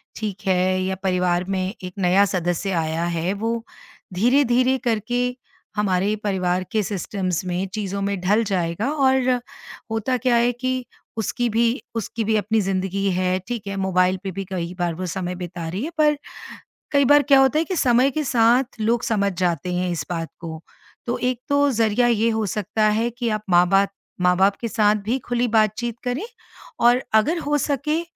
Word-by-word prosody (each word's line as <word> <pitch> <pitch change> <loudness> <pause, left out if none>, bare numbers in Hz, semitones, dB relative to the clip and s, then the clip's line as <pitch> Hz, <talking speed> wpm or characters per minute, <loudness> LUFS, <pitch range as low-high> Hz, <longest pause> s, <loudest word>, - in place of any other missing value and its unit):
ठीक 210 -3 -5
है, 185 0 +2
या 190 0 -1
परिवार 180 -1 +1
में 190 0 -1
एक 180 0 -6
नया 190 +2 +4
सदस्य 180 0 -1
आया 165 -1 -1
है 170 +4 0
वो 225 +3 -2 0.5
धीरे-धीरे 250 +4 +3
करके 245 +3 0 0.4
हमारे 200 0 +1
परिवार 185 -3 0
के 220 -2 +1
सिस्टम्स 185 -2 -2
में, 180 +1 -2
चीज़ों 200 -2 -3
में 200 -1 -1
ढल 205 +5 +2
जाएगा 190 +3 -1
और 265 -3 +2 0.6
होता 225 +3 0
क्या 250 -1 +2
है 235 +1 +3
कि 255 +1 -2 0.3
उसकी 235 +3 -1
भी 230 +4 +1
उसकी 225 +1 -3
भी 220 +1 +1
अपनी 215 +2 +1
ज़िंदगी 195 0 -1
है 185 0 +1
ठीक 235 -4 -4
है 200 - -3
मोबाइल 185 -1 +2
पे 195 - -3
भी 195 +2 -4
कई 175 -2 -3
बार 175 -1 0
वो 185 +2 -4
समय 180 0 -3
बिता 175 -2 -6
रही 190 +7 -4
है 310 - -3
पर 300 -1 +3 0.7
कई 280 -2 +4
बार 290 +3 +6
क्या 275 -2 +5
होता 270 +3 +4
है - - +2
कि 375 - -3
समय 255 -3 +4
के 305 +3 -2
साथ 245 0 +2
लोग 230 +2 +1
समझ 200 -3 +1
जाते 180 -1 0
हैं 180 0 -1
इस 160 -4 -3
बात 165 -2 -3
को। 160 -2 -7 0.5
तो 240 - -1
एक 250 -1 0
तो 285 0 +3
जरिया 230 0 +2
ये 230 -1 +2
हो 220 -1 0
सकता 210 +2 -2
है 225 +3 +1
कि 240 0 -3
आप 215 -1 -2
माँ 175 0 +5
बात 195 +1 +3 0.3
माँ-बाप 185 +2 +3
के 235 - -1
साथ 210 -2 +3
भी 235 +5 +1
खुली 245 0 +1
बातचीत 225 +1 +1
करें 255 - -2 0.6
और 245 +2 +5
अगर 275 +11 +3
हो 295 0 +2
सके 295 +3 0
210 Hz, 185 wpm, -22 LUFS, 185-245 Hz, 0.7 s, बार